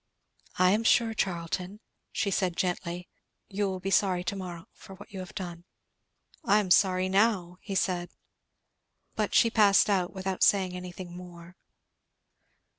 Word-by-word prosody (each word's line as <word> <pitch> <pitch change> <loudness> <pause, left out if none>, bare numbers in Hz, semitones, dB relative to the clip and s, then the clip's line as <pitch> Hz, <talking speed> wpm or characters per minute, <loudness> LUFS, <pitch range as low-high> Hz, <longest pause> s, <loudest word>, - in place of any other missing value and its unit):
"I 185 0 +5
am 215 +3 +1
sure, 230 0 +3
Charlton," 180 +1 -3 0.3
she 200 - -1
said 180 -2 0
gently, 180 -1 -2 0.4
"you 200 0 -1
will 190 -1 -4
be 195 +1 -4
sorry 180 -1 +2
to 190 - -3
morrow 175 -3 -7
for 195 - -13
what 205 +3 -14
you 195 - -7
have 185 -1 -9
done." 175 -4 -6 0.8
"I 205 - +4
am 190 -4 -3
sorry 185 0 +4
now," 190 -3 +1
he 195 - -5
said. 180 -2 0 1.0
But - - -2
she 230 - +5
passed 210 -2 +5
out 185 -3 +1
without 190 -1 -4
saying 190 -3 +3
anything 180 -1 -8
more. 175 -1 -11
185 Hz, 150 wpm, -28 LUFS, 180-200 Hz, 1.0 s, I